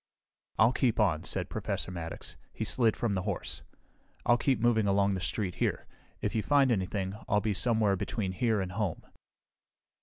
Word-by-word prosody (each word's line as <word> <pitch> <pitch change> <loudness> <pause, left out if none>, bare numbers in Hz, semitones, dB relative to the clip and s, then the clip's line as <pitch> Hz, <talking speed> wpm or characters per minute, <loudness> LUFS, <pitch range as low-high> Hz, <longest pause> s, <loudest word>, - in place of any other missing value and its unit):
"I'll 110 +3 +5
keep 125 -4 +1
on," 90 -8 +2
said - - -1
Professor - - -3
Maddox. 85 -2 -7 0.2
He - - -4
slid 115 0 +2
from 115 -4 0
the 95 - 0
horse. 100 -1 -3 0.6
"I'll 120 - +5
keep 130 0 +1
moving 110 -2 +3
along 100 0 +3
the 95 -2 -2
street 95 -1 -2
here. - - 0 0.4
If - - -1
you 110 - +1
find 140 +1 +3
anything, 95 -2 -1 0.2
I'll 105 0 +4
be 105 0 0
somewhere 110 0 +2
between 95 0 -2
here 110 +2 +1
and 95 -1 -4
home." 100 -3 -2
105 Hz, 175 wpm, -30 LUFS, 95-115 Hz, 0.6 s, I'll